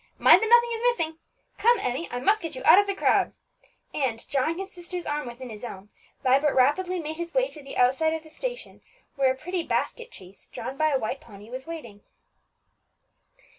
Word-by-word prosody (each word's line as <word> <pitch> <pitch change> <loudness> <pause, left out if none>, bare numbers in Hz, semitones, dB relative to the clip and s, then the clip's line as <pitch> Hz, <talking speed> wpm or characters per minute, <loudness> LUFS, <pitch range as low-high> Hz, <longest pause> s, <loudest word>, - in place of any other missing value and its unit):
Mind - - +7
that 445 - 0
nothing 475 0 +6
is 455 - -4
missing. 330 -10 0 0.4
Come, 475 +2 +5
Emmie, 295 -1 -2
I 245 - -4
must 410 +11 +2
get 325 -3 -5
you 255 - -7
out 380 - +9
of 405 - +2
the 395 - -1
crowd," - - +2 0.6
and, 245 -5 -2
drawing 285 +5 0
his 385 +1 -6
sister's 355 -1 -7
arm 295 -3 -2
within 240 +1 -8
his 215 +1 -10
own, 205 -4 -8 0.3
Vibert 275 +3 +3
rapidly 355 +8 +2
made 315 -1 -5
his 340 +3 -6
way - - +3
to 305 - -11
the 275 - -8
outside 270 +6 +3
of 320 - -6
the 315 - -15
station, - - -6 0.3
where 270 -2 +3
a - - -3
pretty 360 +6 -3
basket 475 +7 -2
chaise, 185 +1 -14
drawn 255 +3 -6
by 310 +2 +2
a 280 - +2
white 260 +4 -4
pony, 210 -6 -14
was 260 +3 -7
waiting. 235 -12 -8
310 Hz, 205 wpm, -26 LUFS, 255-370 Hz, 0.6 s, out